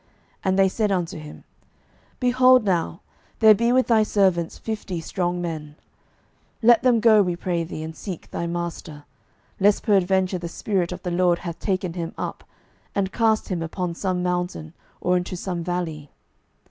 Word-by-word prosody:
12:002:016 - - -36 0.4
And 190 0 +2
they 195 0 +5
said 210 +2 0
unto 180 -2 -2
him, 150 -1 -11 0.8
Behold 255 -1 +5
now, 170 -3 -1 0.4
there 220 -1 +7
be 235 +3 +1
with 255 +1 +4
thy 225 -2 +4
servants 190 -5 +1
fifty 210 -5 -4
strong 175 +1 -2
men; 155 -4 -5 0.9
let 235 0 +6
them 245 -3 +4
go, 220 -2 +6
we 180 -3 0
pray 175 -1 -2
thee, 160 -1 -6
and 160 0 -7
seek 185 -2 -8
thy 170 - -3
master: 170 -3 -5 0.6
lest 200 +1 +3
peradventure 190 -3 +2
the 170 - -5
Spirit 185 -2 -1
of 180 0 -7
the 180 - -3
LORD 175 0 +3
hath 170 -2 -7
taken 185 -3 -1
him 170 -2 -5
up, - - -5 0.5
and 190 -1 0
cast 220 -2 +1
him 180 -3 -2
upon 170 +2 -3
some 180 0 -2
mountain, 180 -3 -2 0.3
or 180 - +2
into 180 0 -4
some 175 -1 -4
valley. 165 -4 -4
180 Hz, 170 wpm, -23 LUFS, 170-205 Hz, 0.9 s, there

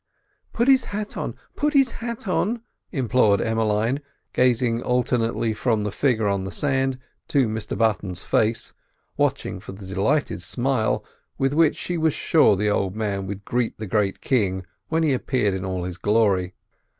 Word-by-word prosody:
"Put 235 +2 0
his 265 -2 +5
hat 210 +1 -5
on, - - -4 0.2
put 295 0 0
his 270 -3 +5
hat 235 -2 -6
on!" 220 +5 0 0.3
implored 125 - +3
Emmeline, 115 +4 +1 0.3
gazing 120 -2 +2
alternately 120 -2 0
from 110 -1 0
the 105 - -2
figure 115 -3 +1
on 100 -1 0
the 95 - -4
sand 135 - 0 0.3
to 135 -4 +2
Mr 110 0 -4
Button's 100 -5 0
face, 110 +1 0 0.4
watching - - 0
for - - -9
the 95 0 -10
delighted 100 +11 0
smile 125 -3 0 0.3
with 135 +1 +1
which 160 0 +4
she 175 -1 -3
was 160 -2 +2
sure 155 -10 +4
the 105 +2 0
old 100 -1 0
man 100 -3 -2
would 100 0 -6
greet 120 -1 -1
the 110 - -5
great 100 -1 0
king 95 -7 0 0.2
when 160 0 +1
he 150 -3 +3
appeared 125 -5 0
in 95 0 -3
all 95 -1 -3
his 90 0 -5
glory. 100 -3 +2
115 Hz, 165 wpm, -23 LUFS, 100-140 Hz, 0.4 s, his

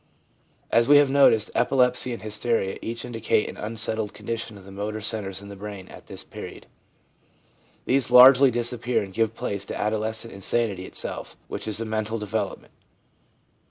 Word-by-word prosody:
As 115 0 +4
we 145 - +8
have 145 -2 +4
noticed, 135 -6 +4
epilepsy 125 0 +2
and 120 - -6
hysteria 110 -2 -1
each 115 +1 -5
indicate 115 -3 0
an - - -7
unsettled 110 0 -2
condition 110 0 -5
of 95 - -15
the 100 - -12
motor 105 +2 -4
centres 100 -2 -3
in 100 - -10
the 100 - -9
brain 100 -1 -8
at - - -13
this - - -5
period; - - -10 1.2
these 135 -1 +1
largely 130 +2 +8
disappear 120 0 -1
and 95 -1 -10
give 115 +1 0
place 100 -5 -4
to - - -6
adolescent 110 +2 -2
insanity 100 -1 0
itself, - - -5
which - - -6
is 110 0 -2
a 115 - -3
mental 110 +1 -2
develop 105 -3 -3
ment. - - -24
110 Hz, 165 wpm, -24 LUFS, 105-120 Hz, 1.2 s, we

